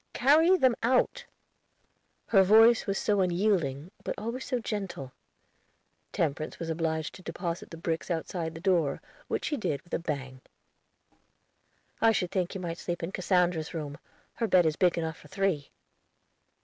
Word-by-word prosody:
"Carry 320 +8 +5
them 260 -7 +3
out." 250 +2 +1 1.0
Her 195 - +6
voice 225 +5 +6
was 195 -1 0
so 205 -2 +1
unyielding, 175 -5 0
but - - -3
always 235 +4 -4
so 250 - -1
gentle! 195 - -4 1.0
Temperance 155 -1 -2
was 165 -1 -4
obliged 160 -1 -2
to - - -12
deposit 175 -2 -5
the 165 - -9
bricks 165 +1 -3
outside 165 -1 -3
the - - -7
door, 175 -6 +1 0.3
which - - -2
she 295 - -1
did 150 - -1
with 175 - -18
a - - +1
bang. 135 -5 -5 1.6
"I 225 0 +5
should 180 -3 -1
think 180 -1 -1
you 190 - -4
might 170 -1 -4
sleep 175 -1 -4
in 165 - -3
Cassandra's 180 -3 0
room; 145 -3 -5 0.3
her 230 - -1
bed 185 -3 +5
is 155 -1 +1
big 175 0 +2
enough 160 -1 -2
for - - -15
three." 180 -5 -1
175 Hz, 160 wpm, -29 LUFS, 160-205 Hz, 1.6 s, Her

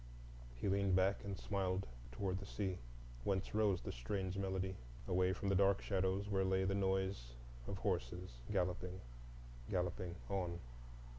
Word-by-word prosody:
He - - -2
leaned 100 -1 +3
back 95 +2 +3
and 100 -1 -3
smiled 95 -1 0 0.3
toward 95 +8 -1
the 100 - -7
sea, 95 -4 -1 0.4
whence 95 +4 0
rose 105 -4 +3
the - - -2
strange 95 +10 -2
melody, 95 -1 0 0.3
away 90 +1 +4
from 100 - -2
the - - +4
dark 100 0 +5
shadows 95 0 +1
where 95 -2 +2
lay 95 0 +3
the 95 +1 +2
noise 95 -10 +1 0.3
of 100 - -2
horses 90 -2 -1 0.2
galloping, 90 -1 0 0.7
galloping 90 -1 0
on. 90 -3 -1
95 Hz, 145 wpm, -40 LUFS, 90-100 Hz, 0.7 s, dark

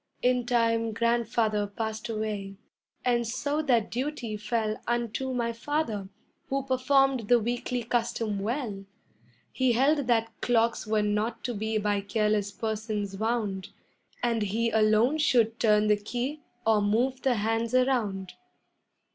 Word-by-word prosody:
In 250 -1 +2
time 230 -2 +2
Grandfather 230 -2 +1
passed 220 +2 -4
away, 210 -3 -3 0.5
and 240 -2 +2
so 285 +6 -1
that 240 -8 +1
duty 250 -3 -3
fell 215 0 -1
Unto 240 +2 -1
my 235 -2 -1
Father, 230 -6 -2 0.4
who 275 0 0
performed 265 -2 +2
the 245 +1 +5
weekly 240 +2 -2
custom 230 -3 -1
well; 215 -2 -3 0.7
He 260 -2 +2
held 275 +3 +2
that 225 -2 +1
clocks 230 -2 +1
were 215 -1 +2
not 210 +2 -1
to 245 - -2
be 220 +1 -1
by 205 -1 0
careless 210 -1 0
persons 210 -1 -3
wound, 215 -4 -1 0.5
And 235 -2 +1
he 225 +3 0
alone 220 +7 +3
should 235 -7 +3
turn 210 -2 +4
the 210 0 +4
key 245 +8 -4 0.3
or 220 -1 +4
move 245 +6 +1
the 260 -2 +2
hands 225 +2 0
around. 220 -8 +1
230 Hz, 135 wpm, -28 LUFS, 215-245 Hz, 0.7 s, the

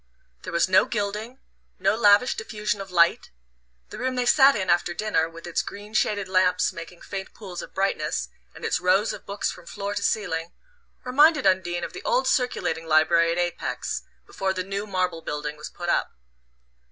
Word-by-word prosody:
There - - -7
was 170 +1 +2
no 185 - +5
gilding, 215 +3 -3 0.4
no - - +2
lavish 210 +2 +5
diffusion 210 -2 -3
of 195 - -8
light: 170 -2 +3 0.6
the - - -7
room 255 0 -1
they 250 -1 0
sat 275 +2 +6
in 190 -3 -2
after 175 0 +1
dinner, 210 -7 0
with 165 0 -12
its 175 - 0
green 205 +1 -9
shaded 205 -2 +1
lamps 185 -1 +2
making 170 +1 -10
faint 195 -1 -7
pools 185 -5 -7
of - - -11
brightness, 195 +1 -1 0.3
and - - -8
its - - +1
rows 190 +4 +2
of - - -11
books 200 +1 -2
from 180 -2 -13
floor 200 +2 -4
to - - -3
ceiling, 170 -5 -1 0.5
reminded 295 +2 +4
Undine 180 -2 +1
of - - -5
the 375 - -7
old - - +1
circulating 165 - 0
library 165 +2 +4
at 170 - -2
Apex, 175 0 -2 0.2
before 190 0 -2
the 185 -1 -3
new 200 +2 -4
marble 180 -4 -1
building 150 -1 -4
was 150 0 -8
put 175 - -7
up. - - +1
190 Hz, 185 wpm, -25 LUFS, 175-210 Hz, 0.6 s, sat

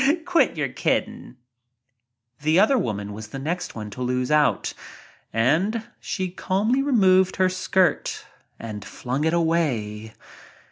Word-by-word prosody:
Quit 355 -2 +2
your - - -1
kidding." - - -2 1.1
The 155 +4 +3
other 220 +7 +5
woman 105 - -2
was 105 +1 -8
the 125 - -7
next 165 +6 -4
one 105 -2 -6
to 125 - -8
lose 125 +1 -1
out 145 -8 +2 0.6
and 165 - +1 0.2
she 185 -3 -3
calmly 210 +8 0
removed 190 -9 +4
her 185 -1 +3
skirt 185 -2 0 0.3
and 105 -3 -6
flung 130 +8 -3
it 160 - +2
away. 120 -11 -1
160 Hz, 130 wpm, -24 LUFS, 115-190 Hz, 1.1 s, other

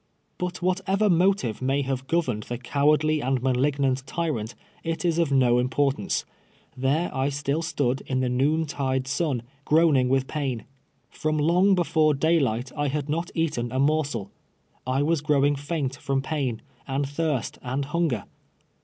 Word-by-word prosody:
But 180 0 -4
whatever 190 +3 +2
motive 175 - +2
may 135 +2 +1
have 135 0 -3
governed 145 -11 0
the 120 +3 -5
cow 140 +4 +1
ardly 155 0 +2
and 130 0 0
malignant 135 0 +1
tyrant, 145 -10 -2 0.3
it 165 +1 -2
is 170 -1 +2
of 165 -4 +1
no 125 -3 +4
im]»ortance. 135 +2 0 0.5
There 140 +6 0
I 135 +1 +1
still 145 +2 -1
stood 140 -5 -1
in 130 -1 0
the 130 - +1
noon 145 +6 +1
tide 130 -3 -1
sun, 135 -3 -1 0.2
groaning 150 -5 +4
with 135 0 +2
pain. 135 -6 -3 0.5
From 155 0 -1
long 180 +6 +4
before 155 -4 +2
daylight 135 -6 +1
I 145 -1 0
had 145 +1 -2
not 165 +3 -1
eaten 150 -8 -1
a 130 - -2
morsel. 140 -7 0 0.6
I 130 +2 +1
was 160 0 +1
gi'owing 145 -1 +3
faint 145 -2 -3
from 135 -1 -1
])ain, 130 -7 -1 0.2
and 135 +1 -1
thirst, 145 -4 -2
and 130 +3 -2
hunger. 150 - 0
140 Hz, 155 wpm, -25 LUFS, 130-160 Hz, 0.6 s, no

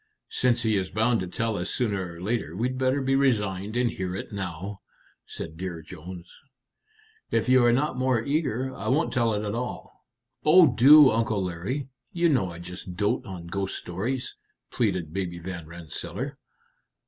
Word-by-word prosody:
"Since 120 -2 +2
he 110 -2 +2
is 95 -1 -1
bound 115 +2 +2
to 95 - -3
tell 115 +4 -2
us 90 +2 -2
sooner 100 -7 -1
or 85 - -11
later, 105 -5 -2
we'd 125 +5 -1
better 130 +1 +1
be 135 +1 +1
resigned 105 -6 +1
and 125 0 +3
hear 90 -1 -4
it 100 - -6
now," 95 0 -5 0.5
said 80 -1 -7
Dear 85 -3 -5
Jones. 90 +2 -9 1.0
"If - - +1
you 130 0 +6
are 120 - +5
not 130 +1 +1
more 130 -2 +2
eager, 130 -4 -1
I - - -6
won't 150 +6 +1
tell 115 -4 +2
it 105 +1 -2
at 105 - -2
all." 125 +2 -5 0.4
"Oh, 155 -3 +7
do, 140 +3 +8
Uncle 110 -3 0
Larry! 95 - -3 0.2
you 170 -1 +2
know 120 - +2
I 85 - -9
just 90 +1 -8
dote 100 +2 0
on 90 -3 -7
ghost 95 +2 -3
stories," 115 +9 -3 0.4
pleaded 90 -9 -1
Baby 90 -2 -3
Van 85 -2 -7
Rensselaer. 80 -1 -6
105 Hz, 170 wpm, -26 LUFS, 90-125 Hz, 1.0 s, do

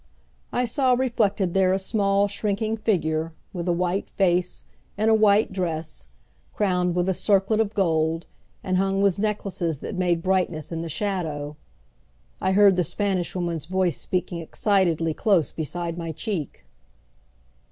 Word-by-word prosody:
I 250 - +1
saw 255 +1 +2
reflected 210 -7 0
there 190 -1 +3
a - - +2
small, 200 0 +1
shrinking 210 +2 -1
figure, 165 -7 0 0.2
with 175 -1 -4
a - - +3
white 180 +3 -1
face, 180 -2 0 0.3
in 215 +2 +2
a - - +5
white 215 -1 +4
dress, 160 - -4 0.5
crowned 180 -3 +1
with 180 0 +1
a 190 - +2
circlet 195 +3 +2
of 220 -1 0
gold, 165 -3 +1 0.4
and 185 -1 0
hung 195 +1 +1
with 200 -1 +2
necklaces 195 -6 -1
that - - -5
made 175 -2 0
brightness 180 -5 0
in 165 -1 -3
the 165 - -5
shadow. 155 -6 -3 0.9
I 190 - +1
heard 200 -1 +6
the 180 - +3
Spanish 185 +1 -2
Woman's 170 -4 -2
voice 185 -2 0
speaking 180 -1 -2
excitedly 165 -2 +1
close 185 -3 +2
beside 170 +2 -4
my 165 -1 -4
cheek. 165 - -4
185 Hz, 150 wpm, -24 LUFS, 170-200 Hz, 0.9 s, heard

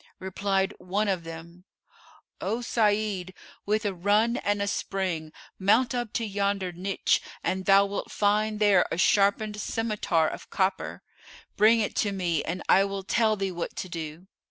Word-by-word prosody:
Replied 195 +1 -1
one 200 +4 -1
of 185 -4 -1
them, 165 +2 -10 0.8
'O 230 +2 -1
Sa'id, 210 -5 0 0.3
with 215 +2 +1
a 200 - 0
run 210 +6 +2
and 205 0 0
a 200 - 0
spring 185 -6 -2 0.3
mount 225 +6 +3
up 240 -3 -2
to 230 - -1
yonder 200 -2 -1
niche[FN#442] 190 +3 0 0.2
and 190 0 -1
thou 195 0 +6
wilt 200 0 -4
find 210 +1 +1
there 205 -4 +5
a - - -1
sharpened 205 +3 +2
scymitar 210 -7 0
of - - -7
copper: 190 0 -1 0.5
bring 225 +2 +5
it 210 - -2
to 205 - +1
me 175 -5 -1
and 175 +2 -4
I 195 - +6
will 195 -1 -4
tell 220 +2 +2
thee 195 -2 -2
what 175 -1 -5
to 185 - -5
do. 165 0 -6
200 Hz, 160 wpm, -27 LUFS, 185-210 Hz, 0.8 s, thou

